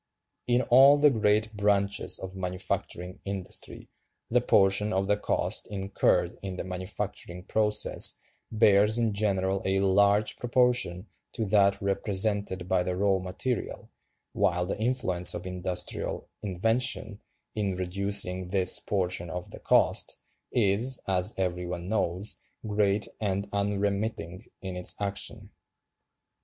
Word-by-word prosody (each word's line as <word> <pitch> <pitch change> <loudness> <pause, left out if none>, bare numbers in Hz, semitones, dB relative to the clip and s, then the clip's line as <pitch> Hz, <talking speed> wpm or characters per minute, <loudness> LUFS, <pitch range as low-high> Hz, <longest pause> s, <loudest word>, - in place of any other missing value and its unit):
In 125 +1 +2
all 135 +4 +6
the 145 0 +5
great 110 -1 +1
branches 100 -1 +1
of 95 0 -8
manufacturing 90 -1 -4
industry 95 -2 -5 0.4
the 125 +1 +3
portion 100 -1 +3
of 95 +1 0
the 105 +1 +2
cost 105 - 0
incurred 100 -1 0
in 95 -2 -5
the - - -5
manufacturing 95 -1 -6
process 105 +1 +2 0.4
bears 105 0 +4
in 115 -3 0
general 95 -2 0
a 95 0 +1
large 100 +2 +2
proportion 120 -7 +1 0.3
to 110 - -2
that 100 -1 +3
represented 100 -1 0
by 95 -1 +2
the 90 0 -2
raw 95 0 +1
material, 100 +6 -4 0.4
while 90 +1 +1
the 100 - -4
influence 110 -7 +2
of - - -6
industrial 90 0 -3
invention, 110 +2 -1 0.3
in 100 -3 -2
reducing 95 0 +1
this 95 -1 +3
portion 90 -3 -1
of 90 +2 -6
the - - -10
cost, - - +1 0.3
is, 115 +4 +1
as 95 +2 0
every 90 -2 -2
one 85 0 -5
knows, 95 -1 -1 0.3
great 105 -1 +1
and 100 -1 -2
unremitting 100 -3 -2 0.2
in 95 -1 -5
its 90 - +1
action." 100 -1 -4
100 Hz, 125 wpm, -27 LUFS, 95-105 Hz, 0.4 s, all